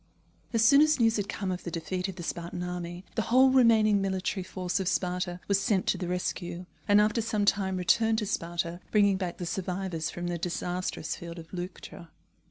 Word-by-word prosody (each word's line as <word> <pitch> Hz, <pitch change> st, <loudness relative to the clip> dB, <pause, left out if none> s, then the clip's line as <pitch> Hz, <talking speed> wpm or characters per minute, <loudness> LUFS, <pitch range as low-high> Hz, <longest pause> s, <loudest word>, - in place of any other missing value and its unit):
As 225 Hz, -1 st, +3 dB
soon 280 Hz, +4 st, +7 dB
as 310 Hz, -2 st, +4 dB
news 225 Hz, -1 st, +3 dB
had 205 Hz, 0 st, -2 dB
come 195 Hz, -2 st, -3 dB
of 180 Hz, -, -4 dB
the -, -, -4 dB
defeat 180 Hz, +3 st, -3 dB
of 190 Hz, -, -6 dB
the 175 Hz, -, -7 dB
Spartan 170 Hz, +1 st, -4 dB
army, 180 Hz, 0 st, -5 dB
the 225 Hz, -, 0 dB
whole 260 Hz, +4 st, +5 dB
remaining 220 Hz, -5 st, +5 dB
military 190 Hz, 0 st, -1 dB
force 185 Hz, 0 st, -3 dB
of 190 Hz, -, -2 dB
Sparta 180 Hz, -1 st, -1 dB
was 200 Hz, -1 st, +3 dB
sent 195 Hz, -1 st, +1 dB
to -, -, +1 dB
the 180 Hz, -, -3 dB
rescue, 175 Hz, 0 st, -3 dB, 0.2 s
and 205 Hz, 0 st, +6 dB
after 215 Hz, +2 st, +2 dB
some 215 Hz, -2 st, 0 dB
time 190 Hz, -2 st, +1 dB
returned 220 Hz, +5 st, +3 dB
to 215 Hz, -, -1 dB
Sparta, 170 Hz, -2 st, -2 dB
bringing 200 Hz, -2 st, +4 dB
back 180 Hz, -3 st, -4 dB
the 175 Hz, -, -4 dB
survivors 180 Hz, -2 st, -3 dB
from 175 Hz, -, -5 dB
the 175 Hz, -1 st, -2 dB
disastrous 180 Hz, -1 st, -3 dB
field 170 Hz, 0 st, -8 dB
of 165 Hz, +1 st, -11 dB
Leuctra. 175 Hz, -1 st, -7 dB
185 Hz, 200 wpm, -28 LUFS, 175-210 Hz, 0.2 s, soon